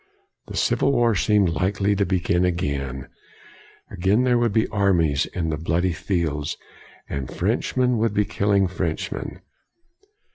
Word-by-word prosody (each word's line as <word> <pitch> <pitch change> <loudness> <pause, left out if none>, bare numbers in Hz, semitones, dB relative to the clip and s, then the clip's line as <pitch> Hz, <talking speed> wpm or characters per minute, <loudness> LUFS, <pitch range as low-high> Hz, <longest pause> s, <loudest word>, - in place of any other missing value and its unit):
The - - -6
civil 140 - +2
war 120 -3 +3
seemed 100 -1 +2
likely 100 +5 0
to 100 0 0
begin 90 -1 +1
again. 70 -7 -2 0.8
Again 100 +7 +2
there 125 -1 +3
would 120 -2 +1
be 110 +2 +2
armies 85 -8 +2
in 80 -3 -3
the 75 - -2
bloody 85 +3 0
fields, 80 -4 -2 0.5
and 70 -3 -4
Frenchmen 125 -2 0
would 110 -1 0
be 105 - +2
killing 100 -1 +1
Frenchmen. 85 -3 -4
95 Hz, 135 wpm, -23 LUFS, 80-105 Hz, 0.8 s, war